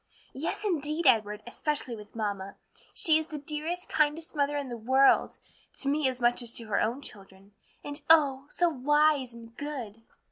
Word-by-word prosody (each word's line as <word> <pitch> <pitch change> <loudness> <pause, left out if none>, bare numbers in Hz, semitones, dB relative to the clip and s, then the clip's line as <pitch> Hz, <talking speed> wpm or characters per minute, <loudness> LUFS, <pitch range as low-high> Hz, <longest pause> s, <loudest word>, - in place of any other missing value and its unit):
"Yes, 325 +9 -3
indeed, 320 -3 -1
Edward, 215 -4 +3
especially 260 0 -2
with 210 0 -13
mamma. 200 -3 -3 0.4
She 315 -1 +4
is 315 - -5
the 305 - -6
dearest, 305 +5 -4
kindest 310 +2 0
mother 290 0 +1
in 285 -2 -3
the 240 - -5
world; 260 +4 +3 0.4
to 275 - -2
me 290 0 +2
as 255 -1 -5
much 240 0 +2
as 235 -2 -3
to 230 - 0
her 205 - +1
own 240 +6 -1
children, 195 0 -11 0.3
and 290 +1 -5
oh, 280 -4 +5
so 350 - +2
wise 295 -3 +2
and 230 0 -13
good!" 250 -8 -6
275 Hz, 175 wpm, -28 LUFS, 230-300 Hz, 0.4 s, oh